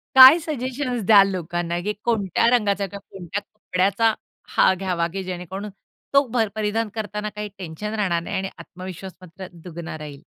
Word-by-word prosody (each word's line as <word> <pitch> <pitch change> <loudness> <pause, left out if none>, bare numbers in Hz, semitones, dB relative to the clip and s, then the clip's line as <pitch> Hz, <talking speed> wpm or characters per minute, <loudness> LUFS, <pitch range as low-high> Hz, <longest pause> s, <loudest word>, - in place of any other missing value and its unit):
काय 265 +5 +11
सजेशन्स 260 -5 -3
द्याल 200 -2 +7
लोकांना, 175 -1 -2
की 210 +1 -1
कोणत्या 220 -2 +1
रंगाचा 200 -2 0
किंवा 200 +1 -9
कोणत्या 190 +2 -5
कपड्याचा 200 +2 0 0.4
हा - - +6
घ्यावा 180 -3 -1
की 195 -1 -3
जेणेकरून 185 +3 -6 0.4
तो 280 0 +5
भर 225 -3 +2
परिधान 215 +1 -1
करतांना 210 -1 -3
काही 210 0 -4
टेन्शन 190 +4 -6
राहणार 185 -6 0
नाही - - -4
आणि 195 0 -2
आत्मविश्वास 185 +2 -9
मस्त 185 +1 -14 0.2
दुगना 170 -2 -7
राहील? 150 -2 -9
195 Hz, 160 wpm, -23 LUFS, 180-215 Hz, 0.4 s, काय